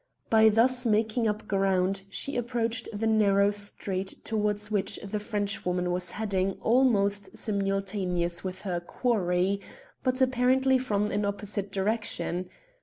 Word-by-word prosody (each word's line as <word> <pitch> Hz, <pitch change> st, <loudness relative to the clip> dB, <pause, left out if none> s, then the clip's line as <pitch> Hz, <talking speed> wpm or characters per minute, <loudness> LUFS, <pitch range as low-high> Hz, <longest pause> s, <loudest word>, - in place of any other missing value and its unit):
By 220 Hz, -1 st, +7 dB
thus 245 Hz, +3 st, +3 dB
making 220 Hz, 0 st, +1 dB
up 210 Hz, 0 st, -3 dB
ground 195 Hz, -1 st, +1 dB
she 275 Hz, +7 st, -1 dB
approached 240 Hz, -1 st, -1 dB
the 215 Hz, +1 st, -3 dB
narrow 205 Hz, -2 st, +4 dB
street 200 Hz, -2 st, -2 dB
towards 210 Hz, -1 st, -1 dB
which 205 Hz, -2 st, 0 dB
the 210 Hz, +1 st, -3 dB
Frenchwoman 200 Hz, -4 st, -1 dB
was 180 Hz, 0 st, -1 dB
heading 195 Hz, -2 st, -1 dB
almost 205 Hz, -5 st, +2 dB
simultaneously 195 Hz, -3 st, -1 dB
with 185 Hz, +1 st, -10 dB
her 180 Hz, -4 st, -2 dB
quarry, 190 Hz, -1 st, 0 dB, 0.4 s
but 255 Hz, 0 st, 0 dB
apparently 260 Hz, +1 st, +3 dB
from 210 Hz, -4 st, -1 dB
an 205 Hz, +1 st, 0 dB
opposite 200 Hz, -1 st, -3 dB
direction. 195 Hz, -3 st, -2 dB
205 Hz, 125 wpm, -28 LUFS, 195-225 Hz, 0.4 s, By